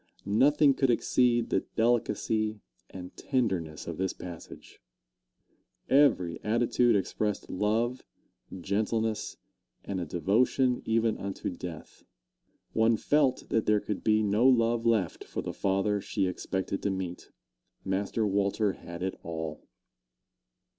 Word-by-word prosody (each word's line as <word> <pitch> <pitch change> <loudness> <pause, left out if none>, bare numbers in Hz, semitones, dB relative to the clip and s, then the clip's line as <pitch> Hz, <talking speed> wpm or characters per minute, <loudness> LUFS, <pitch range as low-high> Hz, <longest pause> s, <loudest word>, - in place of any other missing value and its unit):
Nothing 140 +8 +4
could 135 0 +1
exceed 120 0 +2
the - - +3 0.2
delicacy 110 -2 +1 0.3
and 90 -1 -9
tenderness 95 - -2
of 85 -1 -6
this 95 -1 0
passage. 85 -3 -11 1.1
Every 90 - +3
attitude 120 +2 +2
expressed 105 +2 -2
love, 115 +6 0 0.6
gentleness, 110 +3 -1 0.5
and 95 -2 -3
a 85 - -4
devotion 120 - +1
even 115 -1 +1
unto 100 -1 -4
death. 85 -2 -9 0.7
One 110 0 +3
felt 140 +1 +1
that 110 - 0
there 105 0 +4
could 105 -1 -5
be 110 0 +3
no 105 +5 +3
love 115 -2 +3
left 105 -7 +1
for - - -5
the - - -4
father 100 +1 0
she 95 - -1
expected 95 +1 -3
to - - 0
meet 95 -2 -5 0.6
Master 100 +3 -1
Walter 100 0 +1
had 85 +1 -8
it 95 - -1
all. 80 -2 -5
105 Hz, 120 wpm, -29 LUFS, 95-115 Hz, 1.1 s, Nothing